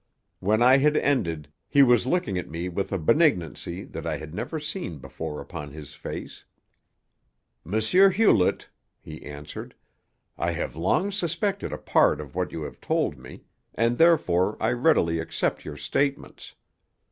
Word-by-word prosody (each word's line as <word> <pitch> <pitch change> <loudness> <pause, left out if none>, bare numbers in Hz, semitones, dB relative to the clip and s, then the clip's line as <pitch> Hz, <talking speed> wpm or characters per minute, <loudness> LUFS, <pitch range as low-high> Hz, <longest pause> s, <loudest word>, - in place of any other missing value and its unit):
When 110 +4 +2
I 130 +2 +7
had 150 +2 +3
ended 85 - 0 0.2
he 140 - +6
was 125 -1 +4
looking 155 - 0
at - - -7
me 85 +3 -4
with 95 +2 -3
a 95 - 0
benignancy 95 - +1
that - - -8
I - - -1
had 80 0 -9
never 160 - -4
seen 150 - -5
before 75 +2 -6
upon 75 +1 -7
his 75 0 -10
face. - - -8 1.3
"M. 110 - +2
Hewlett," 185 - +4 0.3
he 80 0 -10
answered, 75 +1 -9 0.6
"I - - 0
have - - -4
long 95 - +1
suspected 200 +1 -1
a - - -4
part - - +3
of 75 -3 -8
what 90 0 -2
you 80 - -5
have - - -9
told 75 - -1
me, 65 - -12 0.3
and 115 +1 +1
therefore 110 - +3
I 110 - +1
readily 120 - +2
accept 80 - -2
your - - -7
statements. 140 0 -2
105 Hz, 155 wpm, -25 LUFS, -, 1.3 s, I